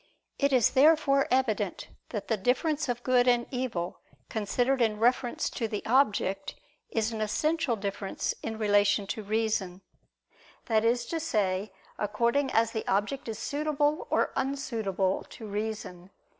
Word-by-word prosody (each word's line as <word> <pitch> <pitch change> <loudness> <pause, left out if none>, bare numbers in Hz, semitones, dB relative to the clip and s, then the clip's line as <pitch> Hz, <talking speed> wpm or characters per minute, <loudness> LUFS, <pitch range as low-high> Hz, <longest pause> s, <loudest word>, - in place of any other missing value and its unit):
It 280 0 +2
is 250 -5 +4
therefore 275 -1 +4
evident 215 -7 0 0.2
that 210 -4 -5
the 225 - +2
difference 270 - 0
of 245 0 -2
good 255 -1 +3
and 240 -1 +3
evil 245 -10 -3 0.3
considered 245 +5 0
in 220 -2 +2
reference 240 +2 +1
to 230 - -2
the 210 -1 -5
object 205 -6 +1 0.3
is 225 0 0
an 220 -1 -4
essential 305 +5 0
difference 195 -1 -3
in 225 -1 -4
relation 205 -1 +3
to 220 - -4
reason; 210 -3 -1 0.8
that 220 -2 +2
is 235 +1 +2
to 330 +6 -3
say, 205 -9 -1 0.3
according 235 +7 +1
as 225 -1 +2
the 220 - -4
object 205 +8 0
is 220 - -4
suitable 295 - 0
or - - +1
unsuitable 220 -9 -1
to 225 - -10
reason. 205 -4 -5
225 Hz, 145 wpm, -28 LUFS, 205-265 Hz, 0.8 s, is